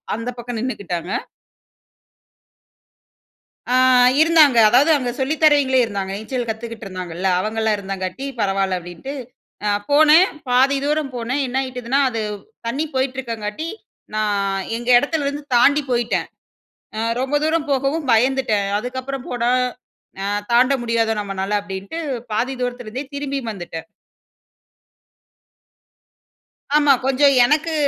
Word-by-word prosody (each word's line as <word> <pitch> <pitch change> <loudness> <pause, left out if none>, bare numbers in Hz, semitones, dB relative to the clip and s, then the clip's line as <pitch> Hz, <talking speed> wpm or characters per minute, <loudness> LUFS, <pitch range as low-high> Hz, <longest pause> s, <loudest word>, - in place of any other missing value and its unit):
அந்த 230 +2 -5
பக்கம் 240 0 -5
நின்னுக்கிட்டாங்க. 185 -8 -4 2.6
அ - - +4 0.5
இருந்தாங்க. 315 -6 +5
அதாவது 265 +7 +4
அங்க 250 -3 -2
சொல்லி 270 +4 0
தரவிங்களே 285 -4 +5
இருந்தாங்க. 200 -4 -3
நீச்சல் 240 +3 -4
கத்துக்கிட்டுருந்தாங்கள்ள, 195 -6 -5
அவங்களலாம் 220 +2 0
இருந்தங்காட்டி 195 +4 -5
பரவால்ல 195 -2 0
அப்டின்ட்டு, 175 +11 -8 0.5
அ - - +2 0.2
போனேன் 310 +5 +6 0.2
பாதி 265 +3 +4
தூரம் 300 -1 -1
போனேன். 245 +4 -2
என்னாயிட்டுதுன்னா, 255 0 -1
அது 225 -2 -3 0.5
தண்ணி 275 +7 -1
போயிட்டுருக்கங்காட்டி, 255 -1 -3 0.5
நான் 200 -2 0 0.2
எங்க 240 +1 -5
எடத்துலேருந்து 290 0 -2
தாண்டி 285 +4 +4
போயிட்டேன். 240 -1 0 0.7
அ - - -2 0.2
ரொம்ப 265 +3 -2
தூரம் 315 -1 0
போகவும் 275 +2 0
பயந்துட்டேன். 230 -3 +2
அதுக்கப்புறம் 260 +3 -5
போனா, 240 -1 0 0.7
அ - - -3 0.3
தாண்ட 250 +3 +5
முடியாதோ 230 -1 +1
நம்மனால, 195 0 -4
அப்டின்ட்டு 195 +10 -6 0.3
பாதி 245 +5 -1
தூரத்திலிருந்தே 245 +2 -4
திரும்பியும் 275 -4 -3
வந்துட்டேன். 170 -4 -8 2.9
ஆமா. 290 -2 +5
கொஞ்சம் 275 +1 +4
எனக்கு 310 +4 +1
245 Hz, 105 wpm, -20 LUFS, 210-275 Hz, 2.9 s, போனேன்